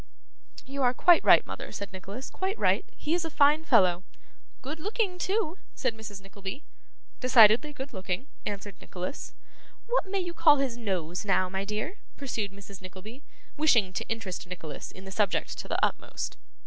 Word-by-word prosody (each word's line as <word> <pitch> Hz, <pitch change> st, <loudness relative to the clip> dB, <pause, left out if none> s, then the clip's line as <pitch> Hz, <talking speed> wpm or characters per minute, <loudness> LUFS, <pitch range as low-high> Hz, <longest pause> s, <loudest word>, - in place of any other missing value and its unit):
'You 275 Hz, +1 st, -4 dB
are 250 Hz, -1 st, +3 dB
quite 350 Hz, +5 st, +6 dB
right, -, -, +7 dB
mother,' -, -, -7 dB
said 200 Hz, 0 st, -6 dB
Nicholas, 195 Hz, +7 st, -7 dB
'quite 385 Hz, +3 st, -2 dB
right. -, -, +3 dB
He 305 Hz, -, -1 dB
is 345 Hz, 0 st, +1 dB
a 325 Hz, -, -3 dB
fine 295 Hz, +1 st, +4 dB
fellow.' 185 Hz, -, +4 dB, 0.6 s
'Good 300 Hz, +5 st, -5 dB
looking, 395 Hz, 0 st, -1 dB
too,' 380 Hz, -2 st, 0 dB, 0.2 s
said 255 Hz, -4 st, 0 dB
Mrs. 210 Hz, -3 st, -8 dB
Nickleby. 195 Hz, +7 st, -7 dB, 0.6 s
'Decidedly 250 Hz, +2 st, +6 dB
good 280 Hz, -2 st, -7 dB
looking,' 190 Hz, +3 st, -3 dB, 0.2 s
answered 205 Hz, 0 st, -5 dB
Nicholas. 180 Hz, +9 st, -6 dB, 0.5 s
'What 480 Hz, -4 st, +1 dB
may 395 Hz, 0 st, 0 dB
you 350 Hz, -2 st, -3 dB
call 310 Hz, -3 st, +6 dB
his 270 Hz, -4 st, 0 dB
nose, 185 Hz, -7 st, -2 dB
now, 185 Hz, -2 st, +2 dB
my 190 Hz, +1 st, -3 dB
dear?' 215 Hz, -, -3 dB, 0.2 s
pursued 225 Hz, -7 st, -3 dB
Mrs. 200 Hz, -1 st, -11 dB
Nickleby, 190 Hz, +8 st, -10 dB, 0.4 s
wishing 235 Hz, -11 st, +4 dB
to -, -, -4 dB
interest 200 Hz, -5 st, -4 dB
Nicholas 165 Hz, -4 st, -7 dB
in 190 Hz, -, -12 dB
the 190 Hz, -, -8 dB
subject 200 Hz, -1 st, 0 dB
to -, -, -6 dB
the -, -, -1 dB
utmost. -, -, -4 dB
225 Hz, 170 wpm, -28 LUFS, 195-300 Hz, 0.6 s, right